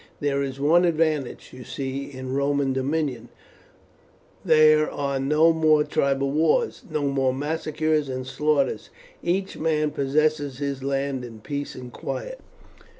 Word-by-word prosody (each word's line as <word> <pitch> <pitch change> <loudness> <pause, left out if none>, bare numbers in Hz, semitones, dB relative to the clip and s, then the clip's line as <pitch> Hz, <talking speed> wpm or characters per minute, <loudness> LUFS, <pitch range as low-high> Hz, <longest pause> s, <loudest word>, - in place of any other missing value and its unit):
There 140 -1 0
is 135 -1 -4
one 160 +5 +4
advantage, 155 -5 0
you 125 0 -9
see, 135 +2 -5
in 130 -1 -6
Roman 140 -1 +1
dominion 135 -3 -2 1.1
there 155 0 +5
are 140 -1 -2
no 150 +4 +4
more 155 -2 +4
tribal 140 -1 0
wars, 165 - +1
no 155 -2 -2
more 135 -2 +1
massacres 155 0 -1
and 130 0 -4
slaughters, 140 -4 0 0.3
each 190 +3 -2
man 155 -1 +1
possesses 145 0 0
his 140 -1 -3
land 135 -1 -1
in 115 -3 -9
peace 145 +3 -5
and 125 -1 -9
quiet." - - -5
140 Hz, 135 wpm, -24 LUFS, 135-155 Hz, 1.1 s, there